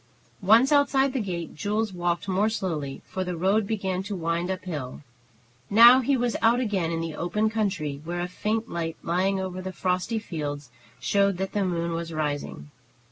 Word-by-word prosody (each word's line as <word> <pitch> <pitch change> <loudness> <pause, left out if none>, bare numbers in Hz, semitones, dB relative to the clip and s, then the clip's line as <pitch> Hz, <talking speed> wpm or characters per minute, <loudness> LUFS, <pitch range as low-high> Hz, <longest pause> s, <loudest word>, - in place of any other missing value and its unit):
Once 225 +8 +5
outside 275 -2 +3
the 265 - 0
gate, 175 -6 -4
Jules 210 +3 -1
walked 175 +2 -1
more 195 +3 +2
slowly, 160 -10 -3
for 190 - -3
the 180 -2 -4
road 195 +4 +2
began 190 -4 -1
to 200 +1 -5
wind 170 0 -1
up 190 -1 -3
hill. 150 -7 -5 0.7
Now 235 +4 +9
he 265 +1 +1
was 240 -1 0
out 230 +2 +4
again 200 -9 0
in 165 0 -2
the 165 -1 -4
open 210 +7 0
country, 185 -10 -2
where 175 +2 -3
a 175 - -2
faint 215 +5 -2
light 165 -1 -4
lying 190 +3 +1
over 185 -1 -4
the 190 0 -5
frosty 185 +5 -1
fields 145 - -5 0.3
showed 200 -2 +2
that 190 +1 -3
the 205 - 0
moon 170 -2 -1
was 165 0 -4
rising. 150 -1 -4
185 Hz, 185 wpm, -26 LUFS, 170-215 Hz, 0.7 s, Now